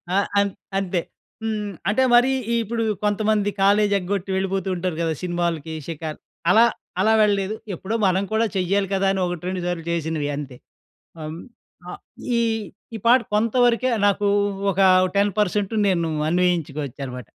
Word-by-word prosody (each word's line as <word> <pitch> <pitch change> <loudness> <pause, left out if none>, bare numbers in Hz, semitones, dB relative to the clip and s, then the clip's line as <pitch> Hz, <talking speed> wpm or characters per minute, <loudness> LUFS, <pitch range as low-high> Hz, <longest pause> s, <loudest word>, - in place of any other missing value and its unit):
ఆహ్, 200 - +2
అం 200 - +3 0.3
అంతే. 185 -2 -1 0.4
హ్మ్, 210 -2 -2 0.2
అంటే 225 +6 +2
మరి 245 +2 +5 0.3
ఇప్పుడు 230 +1 -2 0.2
కొంతమంది 210 0 +1
కాలేజ్ 205 +1 +4
ఎగ్గొట్టి 195 +1 -3
వెళ్ళిపోతూ 195 0 -1
ఉంటారు 180 -1 -2
గదా, 165 -1 0
సినిమాలకి, 170 -3 -2
షికార్ 155 -1 -5 0.3
అలా 225 +4 +7 0.4
అలా 220 +3 +4
వెళ్ళలేదు. 205 0 +1 0.2
ఎప్పుడో 190 +6 -4
మనం 190 +1 +1
కూడా 220 +1 +3
చెయ్యాలి 195 +2 +1
గదా 195 0 +1
అని, 195 - -1
ఒకట్రెండు 180 +1 -3
సార్లు 175 -2 -3
చేసినవి 160 -3 -2
అంతే. 135 -4 -7 0.6
హ్మ్, 155 +1 -6 0.5
ఆహ్, - - -9 0.4
ఈ, - - +2 0.5
ఈ 225 - -4
పాట 250 +2 +6
కొంతవరకే 240 +3 +2 0.2
నాకు 205 0 +2 0.4
ఒక 195 - -2 0.4
10% 205 +1 +1
నేను 170 -4 +1 0.2
అన్వయించుకోవచ్చు 160 -6 -1
అనమాట. 125 -1 -8
195 Hz, 140 wpm, -22 LUFS, 170-210 Hz, 0.6 s, అలా